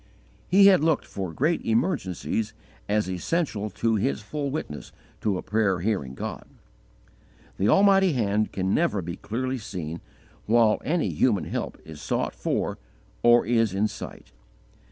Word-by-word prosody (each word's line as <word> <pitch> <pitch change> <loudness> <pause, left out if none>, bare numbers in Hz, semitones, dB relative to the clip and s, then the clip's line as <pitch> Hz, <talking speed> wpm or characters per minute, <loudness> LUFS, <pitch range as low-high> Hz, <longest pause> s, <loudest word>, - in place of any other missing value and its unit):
He 195 +2 +6
had 190 -6 +6
looked 160 -3 +2
for 95 -3 -5
great 155 - 0
emergencies 110 - -1 0.4
as 105 -1 +1
essential 105 - -1
to 115 +3 0
his 70 -9 0
full 140 +6 -4
witness 130 - -5 0.3
to 100 -4 0
a - - -6
prayer 105 -4 +1
hearing 90 -11 -1
God. - - -6 1.1
The 100 - +2
almighty 195 -3 +5
Hand 105 -3 0
can 95 0 -1
never 150 - +1
be 85 +1 -5
clearly 130 +3 -3
seen 85 -6 -6 0.5
while 115 -1 +4
any 165 +2 0
human 115 -6 +2
help - - -4
is 80 -2 -10
sought - - -1
for - - -2 0.4
or 120 0 +5
is 115 -3 +2
in 105 +2 +2
sight. 105 - -9
110 Hz, 145 wpm, -26 LUFS, 95-135 Hz, 1.1 s, He